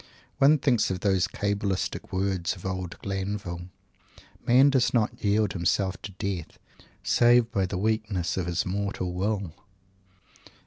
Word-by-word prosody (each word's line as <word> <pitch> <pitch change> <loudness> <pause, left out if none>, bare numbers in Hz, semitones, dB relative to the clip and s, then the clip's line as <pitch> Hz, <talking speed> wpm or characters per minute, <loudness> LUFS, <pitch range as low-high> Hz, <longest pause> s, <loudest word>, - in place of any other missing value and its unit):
One 145 +2 +6
thinks 130 -5 +2
of 95 -1 -3
those 95 -3 +2
Cabalistic 100 0 -2
words 95 -2 -1
of 90 - -13
old 95 -2 -4
Glanville, 95 -3 -4 0.7
"Man 130 +4 +5
does 125 -2 +2
not 110 -3 0
yield 105 0 +2
himself 95 +2 0
to 100 - -7
Death 90 -4 -4 0.5
save 120 -1 +4
by 95 -4 0
the 90 - -4
weakness 105 -3 -1
of 95 -2 -2
his 85 0 -1
mortal 95 -1 -2
Will." 95 -2 -2
100 Hz, 135 wpm, -27 LUFS, 90-110 Hz, 0.7 s, One